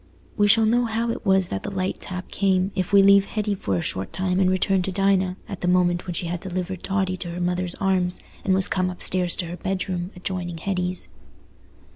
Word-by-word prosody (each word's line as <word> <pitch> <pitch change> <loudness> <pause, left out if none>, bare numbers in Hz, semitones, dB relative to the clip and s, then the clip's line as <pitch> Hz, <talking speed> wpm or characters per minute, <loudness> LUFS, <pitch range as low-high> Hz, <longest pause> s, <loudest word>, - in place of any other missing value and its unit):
We 205 -1 +3
shall 220 +2 +5
know 240 +2 +3
how 230 +1 -1
it - - -6
was 190 -2 +3
that 95 - -3
the - - -5
light 190 -1 -3
tap 185 0 -5
came, 190 -1 +1
if 185 -2 -2
we 200 -1 +7
leave 200 0 +6
Hetty 210 -1 -2
for 100 - -2
a - - -2
short 95 +1 -1
time 185 0 -1
and 185 -1 +4
return 185 +1 +2
to 190 - -2
Dinah, 190 -1 +1
at 195 - -7
the 180 - -1
moment 180 0 +2
when 175 - -3
she 175 - -2
had 170 +1 -3
delivered 185 0 -4
Totty 190 -1 -1
to 175 - -6
her 170 +1 -5
mother's 180 0 -1
arms, 185 -2 0 0.2
and 190 - +2
was 190 -1 +4
come 185 -1 0
upstairs 180 -1 0
to 180 - -2
her 170 +1 -6
bedroom, 185 -1 -3
adjoining 180 -2 -4
Hetty's. 180 0 -2
185 Hz, 220 wpm, -24 LUFS, 180-195 Hz, 0.2 s, we